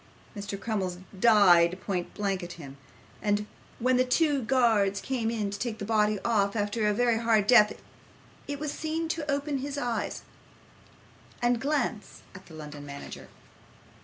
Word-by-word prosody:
Mr. 200 -1 -5
Crummles 195 -5 -2 0.2
died 185 -5 +5
point 180 -3 -3
blank 200 -2 -1
at 175 0 -7
him; 140 -5 -10 0.5
and 205 0 0 0.3
when 255 +1 +2
the 255 - +4
two 285 +2 +2
guards 220 -5 +2
came 245 -4 -2
in 215 -3 -2
to 200 - -6
take 235 -1 -3
the 205 - -5
body 215 -1 +2
off 205 -3 +1
after 210 +1 0
a - - +3
very 235 -1 +2
hard 225 -3 +3
death, 210 -2 +5 0.7
it 285 0 -4
was 300 -1 -3
seen 320 +2 -3
to 310 -2 -3
open 280 -1 -2
its 285 0 -4
eyes 245 -4 -2 1.2
and 240 -1 +1
glance 275 -7 -2
at 185 -1 -13
the 160 - -12
London 150 -2 -9
manager. 140 0 -9
220 Hz, 160 wpm, -28 LUFS, 200-250 Hz, 1.2 s, died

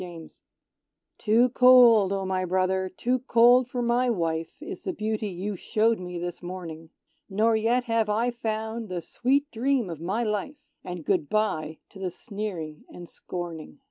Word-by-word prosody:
Clari 170 -3 -9 0.9
Too 230 +3 +3
cold, 245 -5 +6
O 195 -1 -1
my 185 0 -1
brother, 185 +1 0
too 245 +7 -1
cold 245 0 +5
for 245 -1 -3
my 240 +1 +2
wife 165 -6 -2
Is 300 - -8
the 375 - -3
Beauty 215 -3 -2
you 195 +2 -4
showed 220 +4 +1
me 180 -1 -6
this 175 0 -5
morning: 170 -3 -8 0.4
Nor 220 +3 +2
yet 230 +3 +2
have 230 -3 0
I 230 +4 +1
found 220 -1 -4
the 175 -2 -4
sweet 280 +4 0
dream 240 -4 0
of 160 -1 -8
my 195 +8 -1
life, 215 +6 -2 0.3
And 175 -3 -7
good 145 - 0
bye 160 -8 -1
to 195 - -13
the 190 -1 -2
sneering 180 -6 -6
and 175 -1 -10
scorning. 170 -3 -7
210 Hz, 165 wpm, -26 LUFS, 180-235 Hz, 0.9 s, cold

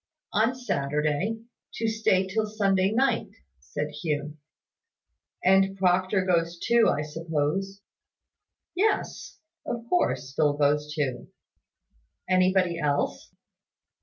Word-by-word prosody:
"On 255 - +2
Saturday, 150 - -1 0.3
to 225 - -1
stay 220 -4 +2
till 215 +3 -1
Sunday 195 -2 +1
night," 260 +4 +1 0.3
said 145 - -4
Hugh. 150 -1 -2 1.1
"And 195 +1 +4
Proctor 185 +1 +2
goes 170 -2 +1
too, 235 +4 +3
I 150 - 0
suppose?" 165 +5 -2 0.9
"Yes; 410 +4 -1 0.3
of 235 -1 -5
course, 135 - 0
Phil 150 -1 +3
goes 150 +1 +1
too." 140 -5 -3 1.0
"Anybody 185 -2 +2
else?" 145 -2 -1
185 Hz, 100 wpm, -26 LUFS, 150-205 Hz, 1.1 s, And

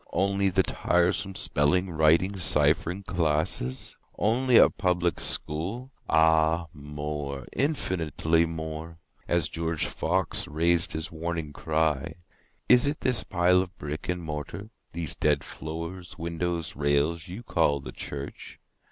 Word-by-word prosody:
Only 100 0 +2
the 95 0 +3
tiresome 90 +3 +1
spelling, 85 +6 +1
writing, 80 +5 +3
ciphering 80 +4 +2
classes? 75 -7 0 0.2
Only 120 +3 +3
a - - +9
Public 90 -1 0
School? 100 - -2 0.2
Ah 80 +1 +4
more—infinitely 75 - -1
more;(As 80 +1 -4
George 80 -1 -2
Fox 90 +1 -1
rais'd 85 +2 +1
his 80 0 -4
warning 80 -2 -4
cry, 80 0 0 0.5
"Is 125 +2 +6
it 145 +2 -2
this 125 -4 +1
pile 90 0 +3
of 95 0 -7
brick 75 +3 -5
and 90 -1 -1
mortar—these 80 +2 -6
dead - - +2
floors, 85 +3 -7
windows, 85 0 -3
rails—you 80 +8 0
call 80 -8 +2
the 65 - -8
church? 70 -1 -7
85 Hz, 110 wpm, -27 LUFS, 75-90 Hz, 0.5 s, a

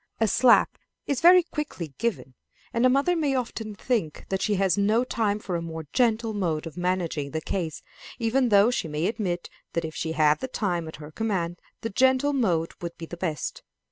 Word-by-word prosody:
A 225 - +3
slap 245 +4 +4 0.3
is 280 -3 -1
very 360 +1 +8
quickly 185 - -5
given, 220 - -2 0.4
and 235 +1 +4
a - - +4
mother 280 +7 +3
may 295 -5 +1
often 225 -4 -3
think 205 - -2
that 190 0 -1
she 210 0 +1
has 190 -2 +2
not 215 +5 +1
time 210 -3 +1
for 190 -4 -4
a 170 - -1
more 160 -1 -6
gentle 230 -2 +2
mode 170 -7 -1
of 165 - -8
managing 180 -5 -1
the 160 - -2
case, 160 -1 -4 0.3
even 245 +2 +1
though 205 +2 +5
she 210 - -1
may 150 +2 -2
admit 190 -5 -2 0.3
that 170 -1 -1
if 160 - -6
she 160 0 -3
had 155 -1 +3
the 260 - -3
time 180 -9 -2
at 160 - -8
her 150 0 -10
command 180 -4 -2 0.2
the 225 - -3
gentle 260 +5 +3
mode 175 -11 +1
would 170 -1 -6
be 165 - -6
the 175 - -8
best. 170 -4 -3
200 Hz, 205 wpm, -26 LUFS, 165-235 Hz, 0.4 s, very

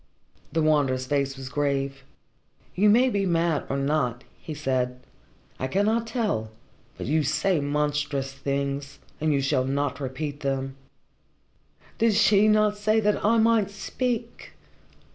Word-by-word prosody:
The 165 -1 +1
Wanderer's 140 -4 +2
face 140 0 -1
was 135 -1 -7
grave. 140 0 -1 0.7
"You 210 +3 +4
may 240 +5 +5
be 200 -2 0
mad 165 -3 +1
or 135 - -1
not," 135 -3 0 0.2
he 155 - -6
said. 130 -3 -1 0.6
"I 130 - -1
cannot 215 - +1
tell. 215 - -1 0.5
But - - -5
you 155 +5 +2
say 155 +5 +1
monstrous 145 -1 -1
things, 140 +1 -3 0.2
and 155 0 +1
you 140 -2 +2
shall 135 -1 +1
not 140 0 -1
repeat 145 +2 -4
them." 135 -1 -2 1.2
"Did 225 -2 +3
she 210 0 +5
not 215 -1 +3
say 215 +1 +2
that 210 -1 +1
I 225 +3 +4
might 225 -3 +3
speak?" 230 +4 -4
150 Hz, 140 wpm, -25 LUFS, 135-205 Hz, 1.2 s, may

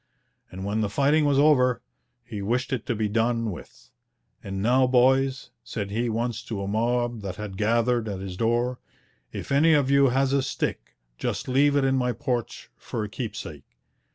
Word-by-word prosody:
And 95 +1 -7
when 105 +2 -1
the 105 - 0
fighting 145 +7 +2
was 140 -1 +2
over, 130 -5 +4 0.4
he 105 - -7
wished 125 +6 -1
it 125 - -3
to 120 - 0
be 110 0 0
done 115 +1 0
with. 85 - -12 0.5
'And 95 0 -5
now, 125 +5 +3
boys,' 130 +1 +2
said 100 -2 -5
he 115 +3 -1
once 115 +1 -2
to 100 -4 -4
a - - -4
mob 120 +2 0
that 95 -3 -5
had 105 -1 -7
gathered 115 +2 +1
at 100 -2 -4
his 95 -1 -6
door, 120 +4 0 0.5
'if - - -7
any 155 +4 +5
of 140 -3 +2
you 140 0 +5
has 135 +2 +1
a 140 - +3
stick, 130 - -4 0.2
just - - -3
leave 140 +3 +3
it 140 -1 +3
in 135 0 +2
my 125 -1 0
porch 120 +1 -4
for 110 - -5
a 105 - -5
keepsake.' 105 - -7
120 Hz, 185 wpm, -25 LUFS, 105-130 Hz, 0.5 s, any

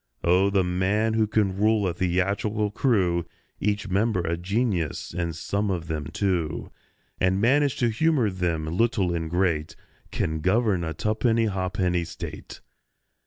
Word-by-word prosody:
Oh, 90 +3 +4
the 100 -1 +2
man 95 +5 +1
who 110 -1 +2
can 105 -3 +1
rule 105 -1 +2
a 90 - -1
theatrical 100 +4 0
crew, 95 -9 +1 0.3
Each 105 0 -1
member 100 +1 +1
a 85 0 -1
genius 90 - -1
(and 85 -2 -2
some 100 +5 -2
of 90 -4 -2
them 80 -2 -3
two), 85 -2 -2 0.5
And 95 +1 +2
manage 140 +5 +3
to 120 - +2
humour 130 -2 +2
them, 85 -4 -1
little 95 +1 +1
and 80 -1 -2
great, 85 -3 0 0.3
Can 80 0 -2
govern 95 +1 +2
a 80 -2 -4
tuppenny 110 +6 +1
ha'penny 95 -3 0
State! - - -8
95 Hz, 145 wpm, -25 LUFS, 85-110 Hz, 0.5 s, Oh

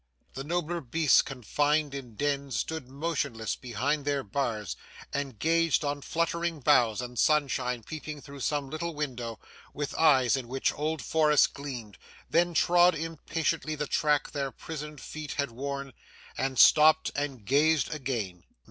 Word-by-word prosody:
The 135 - -5
nobler 170 +2 -2
beasts 155 +3 +4
confined 145 +3 0
in 125 -5 -7
dens, 140 -1 -1
stood 160 0 -3
motionless 140 -6 -2
behind 135 +5 -2
their 140 -1 0
bars 110 - -2 0.4
and 140 -5 -3
gazed 165 0 +2
on 145 0 -2
fluttering 170 +1 -1
boughs, 120 -4 +3
and 125 -1 -6
sunshine 130 -5 +1
peeping 155 +1 -7
through 140 0 -11
some 140 0 -1
little 165 +1 -4
window, 125 -6 -4 0.4
with 145 -1 -3
eyes 135 -7 +4
in 130 -3 -4
which 135 +2 0
old 155 -2 -2
forests 150 -2 +4
gleamed 125 -8 -7 0.3
then 175 +1 +2
trod 175 +1 +5
impatiently 160 0 -2
the 150 0 -2
track 150 0 +1
their 140 -2 -2
prisoned 150 +2 -8
feet 155 +1 -6
had 140 -3 -2
worn 140 +2 -5 0.4
and 135 -1 -2
stopped 155 +4 +6
and 140 -7 -4
gazed 150 +6 +3
again. 115 - -4
145 Hz, 145 wpm, -28 LUFS, 130-155 Hz, 0.4 s, stopped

